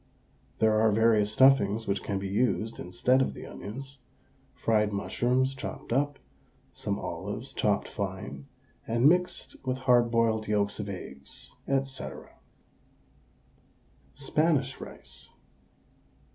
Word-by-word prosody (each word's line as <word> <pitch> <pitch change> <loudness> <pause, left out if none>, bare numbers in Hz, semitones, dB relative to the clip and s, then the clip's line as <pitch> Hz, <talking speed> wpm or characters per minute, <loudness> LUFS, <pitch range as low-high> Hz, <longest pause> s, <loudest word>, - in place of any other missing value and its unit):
There 110 0 +3
are 110 -1 +5
various 110 -1 +4
stuffings 115 -4 +5
which 100 - -1
can 100 - -2
be 95 0 -3
used 110 +2 0
instead 125 +9 +2
of - - 0
the - - -8
onions 135 +6 -8 0.6
fried 105 -2 +2
mushrooms 125 +6 +1
chopped 130 -3 -6
up, 145 +2 +1 0.6
some - - -2
olives - - -5
chopped - - +1
fine 70 +1 -5 0.4
and 115 +4 +4
mixed 180 +3 +1
with 130 -1 -1
hard 125 -2 +4
boiled 115 -2 +2
yolks 105 -1 0
of 105 -1 -4
eggs, 70 -8 -8 0.3
&c. 135 -1 -7 2.1
SPANISH 145 -1 +1
RICE. - - -7
115 Hz, 115 wpm, -29 LUFS, 105-130 Hz, 2.1 s, are